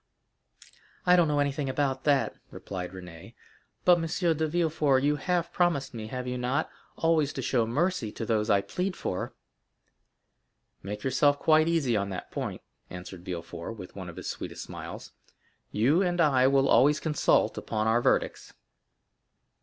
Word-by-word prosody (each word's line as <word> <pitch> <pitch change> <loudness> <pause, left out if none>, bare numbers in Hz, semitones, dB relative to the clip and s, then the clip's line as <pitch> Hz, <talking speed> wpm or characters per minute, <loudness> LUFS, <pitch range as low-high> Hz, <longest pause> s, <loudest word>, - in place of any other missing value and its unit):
"I 180 0 +6
don't 175 -2 +4
know 150 -1 0
anything 145 -1 0
about 135 0 -1
that," 140 -2 +2 0.2
replied 90 -2 -6
Renée; 90 -3 -11 0.5
"but, 175 -1 +6
M. 165 - -2 0.3
de 160 0 0
Villefort, 155 -5 +1
you 145 +1 +2
have 175 +2 -1
promised 170 -8 +1
me—have 120 +3 -5
you 125 0 -3
not?—always 145 +4 -1
to - - -4
show 120 -4 +1
mercy 145 - 0
to 115 - -5
those 110 -1 0
I 100 -2 +4
plead 180 - -3
for." 90 - -4 1.5
"Make 105 +1 -6
yourself 145 +2 +3
quite 155 +1 +4
easy 155 -8 +1
on 100 -1 0
that 95 -2 -6
point," - - -4 0.3
answered 90 0 -9
Villefort, 85 +2 -6
with 90 -3 -10
one 95 -3 -7
of 85 - -10
his - - -7
sweetest - - -5
smiles; - - -8 0.6
"you 135 - +3
and 175 -2 0
I 135 -5 +4
will 135 0 +3
always 145 +3 +5
consult 150 -3 +2
upon 110 -1 -2
our 115 +2 +3
verdicts." - - 0
135 Hz, 155 wpm, -28 LUFS, 105-155 Hz, 1.5 s, I